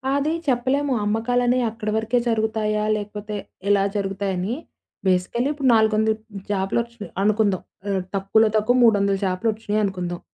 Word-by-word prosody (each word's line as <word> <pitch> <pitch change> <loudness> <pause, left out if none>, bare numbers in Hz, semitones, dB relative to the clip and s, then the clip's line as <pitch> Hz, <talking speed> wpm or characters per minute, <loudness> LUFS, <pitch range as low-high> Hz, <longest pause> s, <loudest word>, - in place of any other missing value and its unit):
అది 295 +3 +1
చెప్పలేము. 265 +3 +1
అమ్మకాలనేయి 245 +3 +1
అక్కడి 215 -1 -4
వరకే 225 +3 +1
జరుగుతాయా? 220 -1 0
లేకపోతే 210 0 -6 0.3
ఇలా 200 -1 +4
జరుగుతాయని? 195 0 -2 0.5
బేసికలీ 185 +7 +1
ఇప్పుడు 285 -3 -1
400ల 220 0 +3 0.4
చాపలొచ్చినాయి 205 +2 -2
అనుకుందాం. 205 -2 +2 0.3
ఆహ్, 195 -1 0
తక్కువలో 200 +3 +3
తక్కువ 215 +3 +3
300ల 200 -3 +4
చేపలొచ్చినాయనుకుందాం. 195 -3 -1
215 Hz, 110 wpm, -23 LUFS, 200-235 Hz, 0.5 s, ఇలా